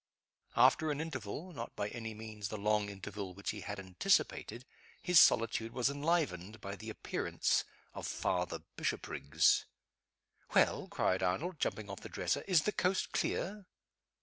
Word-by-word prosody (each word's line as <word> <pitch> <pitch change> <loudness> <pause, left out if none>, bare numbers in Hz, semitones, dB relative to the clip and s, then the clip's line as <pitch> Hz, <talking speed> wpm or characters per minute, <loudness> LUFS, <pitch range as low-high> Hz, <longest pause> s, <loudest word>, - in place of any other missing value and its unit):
After 160 - +5
an 145 -1 -1
interval 155 - -5
not 115 -5 -6
by 100 - -2
any 115 -2 -6
means 110 -2 -6
the 110 - -4
long 105 0 +1
interval 100 -1 -6
which 100 - -3
he 105 - -7
had 100 +1 -5
anticipated 110 - 0 0.3
his 180 -2 +6
solitude 115 0 +4
was 125 +2 +2
enlivened 140 - 0
by 100 0 -5
the 110 +2 -8
appearance 110 - 0 0.3
of - - -5
Father - - -1
Bishopriggs. 70 - +2 0.9
"Well?" - - +4
cried 95 +1 +1
Arnold, 145 - -1
jumping 110 -1 -1
off 100 -1 -6
the - - -9
dresser, - - 0
"is 175 -6 +5
the 210 - +1
coast 190 -1 0
clear?" 200 0 -1
110 Hz, 150 wpm, -34 LUFS, 100-155 Hz, 0.9 s, his